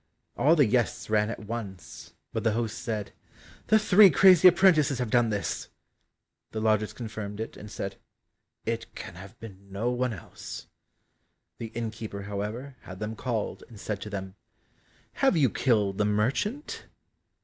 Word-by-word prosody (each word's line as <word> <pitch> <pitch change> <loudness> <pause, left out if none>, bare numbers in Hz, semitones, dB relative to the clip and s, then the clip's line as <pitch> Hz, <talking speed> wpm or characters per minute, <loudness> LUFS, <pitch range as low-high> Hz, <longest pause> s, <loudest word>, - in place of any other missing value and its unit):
All 155 +4 +4
the 145 -4 +5
guests 120 -1 0
ran 105 0 +3
at 115 - -5
once 100 -5 -7 0.2
but - - -2
the 110 - +2
host 115 0 -2
said, 105 -3 -3 0.6
"The 220 - +6
three 210 -1 +7
crazy 185 -1 +7
apprentices 170 -6 +5
have 125 -3 -2
done 120 -2 +4
this;" 105 -2 -2 0.8
the 110 - -4
lodgers 110 -1 +2
confirmed 110 -2 -6
it, 110 - -5
and 105 - -10
said, 95 -1 -5 0.7
"It 115 0 -3
can - - -7
have 95 +6 -12
been 100 -3 -12
no 110 +5 -1
one 125 0 0
else." 95 - -9 0.9
The 115 - -4
innkeeper, 110 -3 -5
however, 105 +7 -5
had 95 - -10
them 110 +2 -4
called, 115 -3 -3
and 110 -4 -12
said 105 -1 -4
to 105 - -6
them, 95 -2 -5 0.9
"Have 270 -10 +4
you 135 -7 +4
killed 105 -6 +1
the 105 - +3
merchant?" 130 - -1
110 Hz, 155 wpm, -28 LUFS, 105-125 Hz, 0.9 s, three